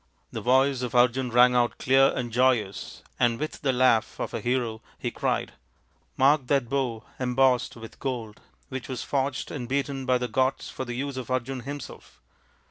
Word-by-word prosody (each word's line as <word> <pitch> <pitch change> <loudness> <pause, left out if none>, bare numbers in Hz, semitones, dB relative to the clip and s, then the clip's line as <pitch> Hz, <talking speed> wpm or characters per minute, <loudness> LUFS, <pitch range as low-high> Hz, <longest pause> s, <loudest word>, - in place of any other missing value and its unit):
The - - -5
voice 130 +1 +3
of 125 0 -4
Arjun 125 +1 +3
rang 125 +1 +5
out 120 -1 +2
clear 135 +1 +5
and 120 -2 -3
joyous, 120 -5 0 0.2
and 120 -1 +2
with 155 - -4
the 135 - +2
laugh 125 -3 +2
of - - -4
a 115 - -3
hero 120 -2 -1 0.2
he - - -3
cried, - - -1 0.3
" - - -40
Mark 135 0 +4
that 135 -4 +1
bow 130 -5 -1 0.2
embossed 125 0 +2
with 115 -1 -11
gold 115 -6 -4 0.3
which 130 -2 -5
was 130 -3 -4
forged 135 -1 -2
and 125 -4 -5
beaten 135 -1 -2
by 130 0 +4
the 125 0 -2
gods 130 +2 0
for 130 - -5
the 120 -1 -5
use 135 +1 -3
of 130 -2 -6
Arjun 130 +1 -2
himself. 140 +2 -9
130 Hz, 185 wpm, -26 LUFS, 120-135 Hz, 0.3 s, rang